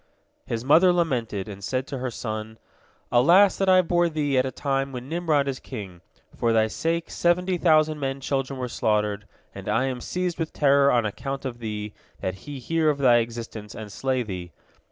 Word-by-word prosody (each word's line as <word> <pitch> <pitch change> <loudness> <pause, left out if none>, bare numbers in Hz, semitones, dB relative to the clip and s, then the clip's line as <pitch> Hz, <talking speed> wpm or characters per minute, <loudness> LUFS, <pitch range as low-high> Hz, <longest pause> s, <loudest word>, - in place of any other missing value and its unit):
His 115 +1 -3
mother 165 +6 +6
lamented, 120 - -1
and 100 -1 -9
said 130 +5 -1
to 135 - -6
her 130 0 -2
son: 110 -1 -5 0.5
"Alas 175 +11 +6
that 195 -1 +1
I 185 0 +6
bore 175 0 +2
thee 150 -3 -1
at 130 0 +3
a - - -4
time 135 +1 -1
when 125 0 -7
Nimrod 155 -3 +1
is 135 -1 -3
king. 95 -9 -8 0.3
For 115 - +1
thy 110 -1 +4
sake 165 +6 -2
seventy 180 +1 +1
thousand 155 -2 +3
men 135 -1 -2
children 135 0 -2
were 125 -1 -3
slaughtered, 105 -3 -1 0.3
and - - -7
I 130 - +2
am 130 -2 -3
seized 180 +3 -3
with 160 -1 -3
terror 140 -1 +4
on 120 -2 +2
account 135 +6 -4
of 120 -2 -5
thee, 105 -2 -5 0.3
that 95 - -2 0.2
he 145 - -5
hear 160 +5 +1
of 145 - +1
thy 125 -4 +5
existence, 115 -2 -4
and 105 -2 -8
slay 130 +2 -1
thee. 90 -5 -7
130 Hz, 195 wpm, -25 LUFS, 115-155 Hz, 0.5 s, mother